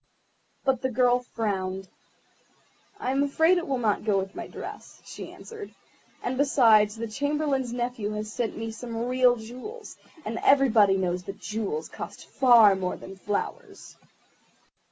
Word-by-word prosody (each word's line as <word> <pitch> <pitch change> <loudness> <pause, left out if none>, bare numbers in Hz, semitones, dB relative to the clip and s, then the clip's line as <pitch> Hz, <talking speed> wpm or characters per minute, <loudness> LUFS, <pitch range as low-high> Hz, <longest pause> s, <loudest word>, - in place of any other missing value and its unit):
But 265 -3 +2
the 260 - 0
girl 245 0 +3
frowned. 195 -6 -3 1.1
"I 255 - -1
am 270 +1 +1
afraid 320 +5 +3
it 345 - -6
will 270 -2 0
not 220 -4 0
go 210 -2 +2
with 195 0 -2
my - - -6
dress," - - -9
she - - -8
answered; 440 -3 -10 0.5
"and, 255 +1 -2
besides, 225 -7 +5
the 230 +1 -4
Chamberlain's 280 +1 -1
nephew 240 -3 -2
has 210 +1 -5
sent 240 -3 -2
me 225 0 -4
some 230 0 -5
real 250 -1 +4
jewels, 255 - -9 0.3
and 225 +2 -3
everybody 225 -8 +5
knows 180 -1 -1
that 195 0 -7
jewels 205 -7 -3
cost - - -8
far 235 -6 +6
more 185 -1 -3
than 195 - -10
flowers." 205 - -5
235 Hz, 150 wpm, -27 LUFS, 210-265 Hz, 1.1 s, far